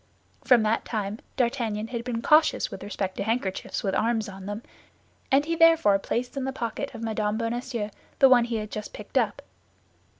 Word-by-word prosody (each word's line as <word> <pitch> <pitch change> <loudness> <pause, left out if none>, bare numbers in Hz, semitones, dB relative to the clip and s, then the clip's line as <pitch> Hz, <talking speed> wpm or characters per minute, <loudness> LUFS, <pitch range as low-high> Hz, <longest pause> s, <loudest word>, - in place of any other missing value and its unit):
From 245 -4 +5
that 215 +1 +1
time, 210 -1 -3 0.2
D'Artagnan 230 -4 -1
had 235 -1 -4
been 235 -2 -3
cautious 310 +1 +4
with - - -7
respect 195 -2 -4
to - - -1
handkerchiefs 220 -3 -2
with 195 -2 0
arms 225 +1 +1
on 195 -1 -9
them, 205 +3 -5 0.7
and 275 +2 +4
he 330 +1 -1
therefore 325 -12 +5
placed 245 +6 -3
in 275 - -2
the 265 - -1
pocket 245 +1 -4
of 230 - -7
Mme. 215 -1 -1
Bonacieux 230 -2 -3 0.3
the 270 - +7
one 245 -2 +6
he 235 -1 -3
had 215 -1 -4
just 210 -1 -6
picked - - -1
up. - - -1
230 Hz, 190 wpm, -26 LUFS, 210-250 Hz, 0.7 s, the